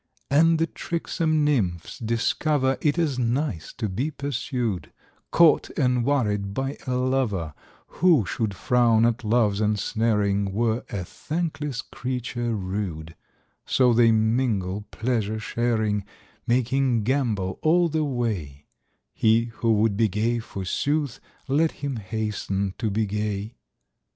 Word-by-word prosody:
72 145 +2 +5
And 165 - +3
the 165 - +2
tricksome 165 -2 -1
nymphs 95 - -1
discover 130 +4 +1
It 150 +1 +1
is 150 -6 0
nice 120 - -1
to 110 - -3
be 120 +10 -2
pursued, 125 - -3 0.4
Caught 170 -3 +4
and 125 -4 +2
worried 105 -7 0
by 135 +1 -3
a 125 - 0
lover; 125 - 0 0.5
Who 165 - +5
should 110 -2 -2
frown 115 0 +3
at 120 +1 0
Love's 110 -2 +2
ensnaring 105 -1 +1
Were 115 +2 0
a 95 -3 -4
thankless 150 - -3
creature 120 -2 -3
rude; 90 -5 -4 0.5
So 125 -2 +4
they 115 0 +5
mingle, 110 -3 0
pleasure 110 -2 -1
sharing, 110 -2 0 0.4
Making 125 -1 +2
gambol 110 -7 0
all 170 +2 +4
the 160 -1 0
way: 105 - -3 0.5
He 115 +1 +2
who 115 - +1
would 105 -1 +2
be 115 0 +4
gay, 110 +4 0
forsooth. 130 +7 -2 0.3
Let 155 +4 +2
him 140 -3 -4
hasten 100 -2 -2
to 110 - 0
be 110 +2 0
gay. 105 +1 -3
115 Hz, 125 wpm, -25 LUFS, 105-135 Hz, 0.5 s, 72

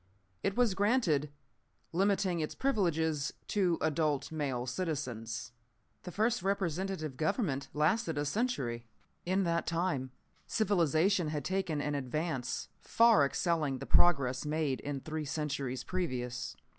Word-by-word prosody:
It 195 - -1
was 240 -5 +4
granted, 190 - +2 0.6
limiting 190 -1 +2
its 155 - -3
privileges 160 - +1 0.2
to 185 -5 +2
adult 150 -3 0
male 135 -6 -2
citizens. 125 -7 -3 0.5
"The 180 - -7
first 220 +4 +1
representative 185 -5 -1
government 155 - 0
lasted 155 +2 +1
a 145 - 0
century. 140 - -1 0.4
In 190 +2 +2
that 170 -1 0
time 165 -6 0 0.4
civilization 180 -3 +2
had 150 -3 -3
taken 185 -6 -1
an 145 0 -1
advance 140 0 -2
far 230 -7 +5
excelling 155 -3 0
the - - -7
progress 135 -7 +4
made 150 -3 0
in 140 -2 -4
three 155 +1 -4
centuries 140 -3 -3
previous. 125 -9 -3
160 Hz, 120 wpm, -32 LUFS, 140-190 Hz, 0.6 s, far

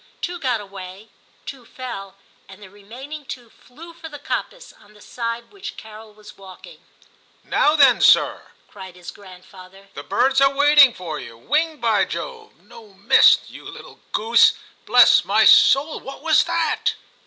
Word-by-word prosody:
Two 350 0 -6
got 255 -6 -2
away, 195 +1 -12 0.4
two 270 -3 -10
fell, 230 -6 -10 0.3
and 190 0 -14
the 195 -3 -15
remaining 250 +9 -11
two 245 -3 -11
flew 330 +7 -16
for 325 -1 -12
the 295 - -10
coppice, - - -7
on 210 - -23
the - - -19
side 230 +2 -6
on - - -32
which 400 0 -10
Carol 220 0 -13
was 210 0 -17
walking. 195 - -15 0.6
*Now 300 +1 +1
then, 275 -5 +4
sir,' - - +2 0.2
cried 190 -3 -13
his 180 -1 -11
grandfather, 190 0 -17
* - - -33
the - - -9
birds 270 +1 0
are 275 0 +2
waiting 285 -1 +5
for 160 -4 -7
you; 115 -1 -12
winged, 305 - -2
by 225 -3 +1
Jove! 455 -3 -9
no, 220 -2 -17
missed. 195 - +3
You - - -13
little - - -13
goose! 230 +2 +3 0.3
Bless - - +5
my - - +1
soul, 290 +3 +4
what 270 +1 -12
was 320 -1 +2
that - - -2
235 Hz, 165 wpm, -20 LUFS, 195-290 Hz, 0.6 s, waiting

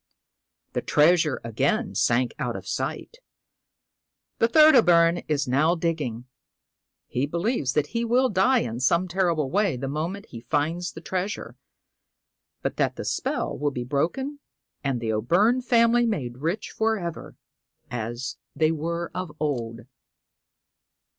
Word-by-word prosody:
The - - -1
treasure 155 -2 +3
again 200 - 0
sank 120 +1 +1
out - - -2
of - - -8
sight. 480 - -4 1.2
The 230 - +4
third 310 +5 +7
O' 245 - +8
Byrne 170 -2 +4
is 145 -3 0
now 150 +7 +3
dig 165 -1 -1
ging. 120 -4 -5 0.8
He 130 +3 -2
believes 170 - -1
that 150 -1 0
he 230 0 0
will 245 +3 +3
die 245 +4 +3
in 115 0 -4
some 170 +8 +2
terrible 170 -6 0
way 195 -8 +1
the 135 +2 -4
moment 165 +8 -3
he 115 - -9
finds 160 +7 -1
the 160 - -9
treasure, 180 - -4 1.1
but - - -2
that - - +1
the - - -6
spell - - -2
will 145 0 0
be 125 -3 -4
broken, 175 - -2 0.4
and 135 -3 -1
the 115 -1 -2
O' 110 - 0
Byrne 210 - +3
family 235 -1 +3
made 130 - -3
rich 170 +8 -2
for 220 0 +1
ever, 170 -4 -6 0.6
as 120 +2 -4 0.2
they 155 0 +3
were 170 +2 -3
of 185 -3 -4
old. 120 -6 -2
165 Hz, 145 wpm, -25 LUFS, 130-205 Hz, 1.2 s, O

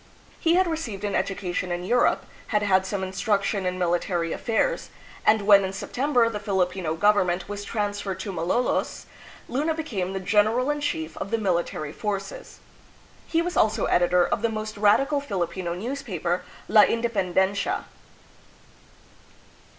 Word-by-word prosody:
He 330 +1 +3
had 375 +1 +4
received 280 - -4
an 205 -1 -1
edu 195 - -1
cation 180 -1 -3
in 175 0 -2
Europe, 240 +7 +2 0.2
had 210 -2 +1
had 190 -1 +3
some 190 0 -2
instruction 195 +1 0
in 180 0 -2
military 175 -1 0
affairs, - - -1 0.4
and 215 -1 +5
when 200 -1 +7
in 190 0 -3
September 245 +4 +1
the 220 -2 -3
Filipino 185 -5 -1
govern 205 +1 +3
ment 175 +1 -2
was 205 0 -5
trans 205 -1 -2
ferred 195 -3 -4
to 200 - -4
Malolos, 185 +8 -1 0.4
Luna 300 +6 0
became 205 - -3
the 195 - -2
general 215 +7 +2
in 295 0 -3
chief 160 - -3
of - - -4
the 230 - +1
military 170 -7 -1
forces. 210 - -5 0.7
He 330 0 +1
was 355 0 -3
also 215 0 +2
editor 175 0 +3
of - - -1
the 230 - +1
most 215 0 -4
radical 275 +8 +3
Filipino 180 -7 -3
newspa 230 - -5
per, 175 +1 +1 0.3
"La 210 +1 +7
Indepen 215 -6 0
dencia." 195 +1 +1
205 Hz, 160 wpm, -25 LUFS, 185-230 Hz, 0.7 s, when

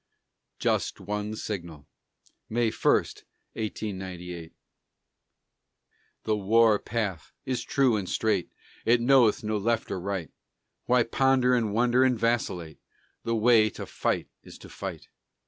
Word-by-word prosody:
JUST - - 0
ONE 105 +1 -4
SIGNAL 85 -9 -6 0.6
[May 115 0 +1
1, - - +3 0.6
1898] 95 -6 -6 1.7
The 110 - +1
war 110 +1 +4
path 105 -8 -3
is 130 -1 -1
true 135 -5 +2
and 95 -3 -4
straight, 110 -5 0 0.3
It 120 +1 +4
knoweth 120 -3 +4
no 105 0 -1
left 115 +2 -1
or 95 - -2
right; 95 -4 -4 0.6
Why 125 -1 +4
ponder 130 +1 +2
and 115 -4 +1
wonder 120 +3 +3
and 130 -2 +3
vacillate? 100 -9 -1 0.5
The 115 - 0
way 110 -1 +5
to - - -8
fight - - -2
is - - -13
to - - -13
fight. - - -7
110 Hz, 125 wpm, -27 LUFS, 100-120 Hz, 1.7 s, way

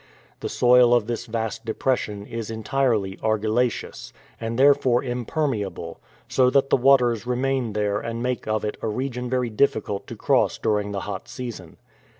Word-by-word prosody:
The - - -4
soil 125 0 +5
of 120 -3 +2
this 120 +1 -4
vast 115 -1 -3
depression 110 -3 -2
is 115 -1 -5
entirely 110 -3 0
argillaceous, 110 +3 -1 0.3
and 115 0 -3
therefore 135 -3 +4
impermeable, 120 - -3 0.3
so 130 -1 +3
that 135 +1 +2
the - - +7
waters 125 -3 +3
remain 125 -2 0
there 105 -1 0
and 115 +1 -4
make 125 -3 -2
of 110 0 0
it 105 - -3
a - - -2
region 125 +2 -3
very 125 -2 0
difficult 105 -4 0
to - - -7
cross - - +2
during 105 -1 0
the 100 -1 -3
hot 100 -1 -6
season. 115 -10 -8
115 Hz, 155 wpm, -24 LUFS, 105-125 Hz, 0.3 s, the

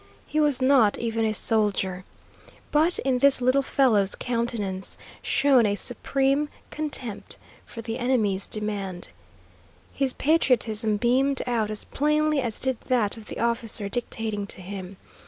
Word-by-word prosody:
He 310 - -1
was 290 -4 +2
not 255 -6 +5
even 225 -1 -1
a 220 - +1
soldier. 200 -4 0 0.7
But 320 +4 +4
in 260 -2 0
this 280 0 +5
little 255 +2 +3
fellow's 225 -8 +2
countenance 230 -6 -2 0.2
shone 270 -5 +3
a 205 - 0
supreme 275 +6 0 0.2
contempt 275 -8 -4 0.3
for 230 - -8
the 225 +2 -4
enemy's 220 -6 +1
demand. 200 -4 -4 0.8
His 270 -2 0
patriotism 230 -8 +2
beamed 260 +4 +2
out 230 -4 0
as 215 -1 -4
plainly 300 0 +1
as 235 -4 -3
did 260 -3 -1
that 235 -6 +1
of 220 -2 -12
the - - -7
officer 230 -3 -1
dictating 220 -3 -3
to 190 - -5
him. 190 0 -7
235 Hz, 140 wpm, -25 LUFS, 210-270 Hz, 0.8 s, not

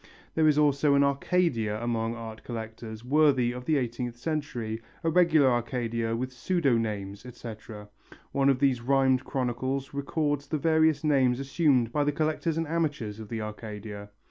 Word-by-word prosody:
There 160 -1 +3
is 150 -1 +4
also 145 -1 +3
an 140 - +5
Arcadia 140 - +1
among 115 -1 -1
art 110 -2 -8
collectors, 110 -1 -7
worthy 135 -3 +3
of 125 0 -7
the 155 -2 +2
eighteenth 120 -1 -3
century, 120 -6 -3 0.2
a 165 - +1
regular 165 -5 +5
Arcadia 115 -1 -1
with 130 +2 -3
pseudo 145 -2 +1
names, 100 -3 -3
etc. 110 -4 -9 0.4
One 140 0 +3
of 135 - +3
these 130 -2 +2
rhymed 130 0 +3
chronicles 130 +1 -2
records 145 0 -1
the 155 - -1
various 160 0 +3
names 135 -4 +3
assumed 135 -4 +2
by 145 +3 +1
the 145 - +1
collectors 155 +1 -1
and 165 -1 -1
amateurs 145 -10 -2
of 110 -2 -9
the 115 -1 -3
Arcadia. 105 -1 -7
130 Hz, 160 wpm, -28 LUFS, 115-145 Hz, 0.4 s, an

